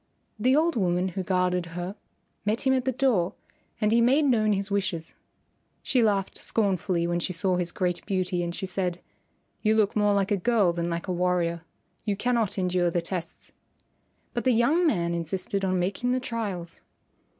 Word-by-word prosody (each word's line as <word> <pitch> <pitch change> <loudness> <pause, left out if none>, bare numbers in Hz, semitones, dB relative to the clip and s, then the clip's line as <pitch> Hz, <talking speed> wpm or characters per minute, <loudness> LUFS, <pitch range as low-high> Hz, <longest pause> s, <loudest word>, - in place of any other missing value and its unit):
The 255 +5 +3
old 330 +3 +2
woman 180 -3 +1
who 190 +2 -4
guarded 180 -1 0
her 180 +3 -4 0.5
met 210 +3 0
him 265 -1 +3
at 255 -1 0
the 260 - +2
door 240 -9 +1 0.4
and 210 -1 +2
he 235 +1 +4
made 270 +6 +4
known 220 -5 +3
his 200 0 -2
wishes. 190 -5 -2 0.7
She 255 - +2
laughed 200 -4 +1
scornfully 185 -5 0
when 175 0 0
she 185 - -2
saw 185 +1 +1
his 175 -1 -2
great 180 -2 -1
beauty, 185 -3 0
and 170 0 -3
she 195 - -4
said, 180 -2 -2 0.6
"You 215 0 +3
look 215 -2 +2
more 205 -1 +3
like 195 0 +1
a 205 - +3
girl 200 -3 +2
than 170 0 -2
like 170 0 -3
a 185 - -1
warrior. 175 -1 0 0.4
You 205 -2 0
cannot 230 -2 0
endure 180 -1 +1
the 175 - 0
tests." 170 0 -6 0.8
But 240 - -2
the 255 - +3
young 295 +10 +3
man 170 - +1
insisted 185 +4 -2
on 185 -1 +1
making 200 +8 0
the 255 - +1
trials. 205 -9 -4
190 Hz, 185 wpm, -26 LUFS, 175-225 Hz, 0.8 s, he